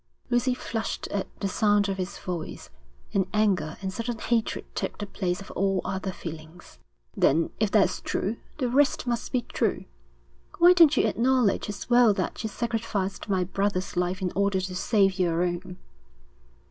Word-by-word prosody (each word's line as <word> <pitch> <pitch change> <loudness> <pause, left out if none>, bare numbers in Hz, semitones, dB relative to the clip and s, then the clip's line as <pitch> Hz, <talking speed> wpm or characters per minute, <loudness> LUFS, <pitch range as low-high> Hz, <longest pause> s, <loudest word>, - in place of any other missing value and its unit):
Lucy 250 +1 +2
flushed 225 -3 -4
at 200 -2 -2
the 200 - +1
sound 205 +1 +2
of 195 -1 -2
his 185 +1 -4
voice, 175 -3 -6 0.4
and 190 -2 +2
anger 190 -8 +1
and 190 0 -3
sudden 230 +3 -3
hatred 230 0 -1
took - - -3
the 205 - -4
place 185 -2 -2
of 195 - -10
all 195 0 +1
other 190 0 -2
feelings. 160 - -10 0.4
'Then 160 +4 +3
if 215 -2 +2
that's 205 -1 +2
true, 215 +4 -2 0.2
the 260 -4 0
rest 275 +3 +2
must 240 -1 -2
be 250 -2 0
true. - - -1 0.7
Why 350 +1 +8
don't 325 -5 +6
you - - +4
acknowledge 245 -4 +2
as 205 -1 -6
well 240 -3 +5
that - - -3
you 220 - -3
sacrificed 215 -4 -3
my 190 -2 +2
brother's 195 +1 -1
life 180 +2 -1
in 180 - 0
order 200 0 +2
to 185 0 -4
save 195 0 +2
your 170 -1 +2
own?' 180 +1 -3
200 Hz, 170 wpm, -26 LUFS, 185-230 Hz, 0.7 s, Why